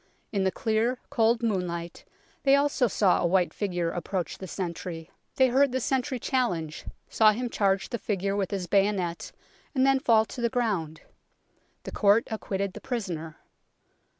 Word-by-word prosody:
In 195 -2 0
the - - +4
clear, 225 +5 0
cold 230 -2 +2
moonlight 175 -6 -2 0.4
they 275 0 +5
also 280 -3 +2
saw 195 -2 +2
a - - +2
white 180 0 +2
figure 175 -5 -2
approach 180 +1 -4
the 190 - -7
sentry; 170 -2 -5
60 160 - -25
UNKNOWN - - -35 0.3
LONDON 250 - 0
they 265 - +3
heard 280 -2 +4
the 260 - +1
sentry 260 0 -1
challenge, 180 - -1 0.2
saw 215 -1 +5
him 240 +2 -3
charge 195 -1 +1
the 235 - -3
figure 200 -1 -1
with 195 -2 -1
his 195 -3 -3
bayonet 195 -2 0 0.4
and 260 0 +3
then 270 0 +4
fall 225 -4 +4
to 240 - -8
the 235 - +2
ground. 205 - -2 0.8
The - - -7
court 205 +2 +3
acquitted 200 -3 -3
the - - -9
prisoner. 180 -11 -4
205 Hz, 175 wpm, -27 LUFS, 180-240 Hz, 0.8 s, they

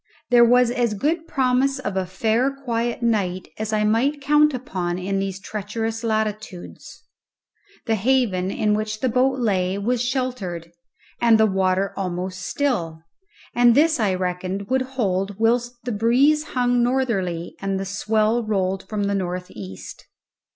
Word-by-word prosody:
There 240 -1 +7
was 245 0 +4
as 240 -3 0
good 320 - -1
promise 265 0 +1
of 205 -7 -4
a 190 -1 -1
fair 225 +7 +1
quiet 240 -3 -3
night 195 -6 0
as 220 0 -3
I 215 -1 +1
might 240 +8 +1
count 295 +2 +4
upon 185 -9 -3
in 195 +2 -2
these 195 -1 -3
treacherous 220 +3 -4
latitudes; 215 -4 -4 0.8
the 225 - +1
haven 220 -5 +1
in 210 +1 0
which 215 0 -2
the 260 - +1
boat 260 +2 +2
lay 195 -5 0
was 230 +4 0
sheltered 245 -10 -3 0.5
and 230 -2 +5
the 220 - +6
water 190 -1 +1
almost 185 -1 -4
still, 175 - -2 0.5
and 240 -1 +5
this 315 0 +4
I 200 -4 +1
reckoned 185 +2 -3
would 260 0 +3 0.2
hold 195 -3 -1
whilst 240 +2 +1
the 245 - -3
breeze 255 +8 +3
hung 245 -1 +2
northerly 215 -10 -1
and 195 -1 -1
the 195 - -3
swell 215 +3 +1
rolled 195 -3 -1
from 210 -2 -2
the 200 0 0
north 180 -2 -3
east. 95 -3 -10
220 Hz, 150 wpm, -22 LUFS, 190-245 Hz, 0.8 s, There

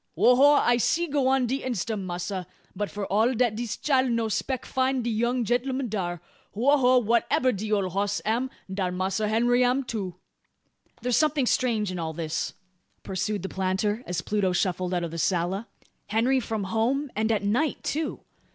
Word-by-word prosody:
"Ho 250 - +5
ho! 285 +3 +6
I'se 245 +4 +3
go 280 -2 +2
on 265 -1 +3
de 265 +3 -1
instum, 215 -5 -3
massr; 180 +1 -4 0.3
but 205 +1 -2
f'r 205 -1 -4
all 225 +6 +2
dat 240 -1 +2
dis 235 -1 -3
chile 265 -3 +2
no 230 -2 0
speck 255 +5 -2
find 260 -1 0
de 235 - -1
young 235 +2 0
genl'um 255 +3 0
dar. 175 -4 -3 0.3
Ho! 265 +7 +4
ho! 255 -2 +5
wha'ebber 235 +3 +2
de 215 +2 -4
ole 200 -3 +2
hoss 200 +2 0
am, 235 +5 0 0.2
darr 190 -1 -2
Massr 190 +4 -1
Henry 240 +3 +3
am 250 +2 +2
too." 200 -8 -4 0.9
"There's 250 -1 +2
something 300 -3 +2
strange 225 -6 +1
in 180 - -4
all 160 -1 -3
this," 160 0 -3 0.5
pursued 195 +1 -2
the 190 - -3
planter, 190 +4 -1
as 175 -2 -2
Pluto 200 -2 0
shuffled 180 0 0
out 175 - 0
of 170 - -4
the 165 - -5
sala. 185 +6 0 0.4
"Henry 240 +5 +2
from 220 -3 -3
home; 240 +8 0
and 220 +1 +1
at 210 -2 0
night 245 +10 0
too. 310 +1 -2
220 Hz, 180 wpm, -26 LUFS, 190-250 Hz, 0.9 s, ho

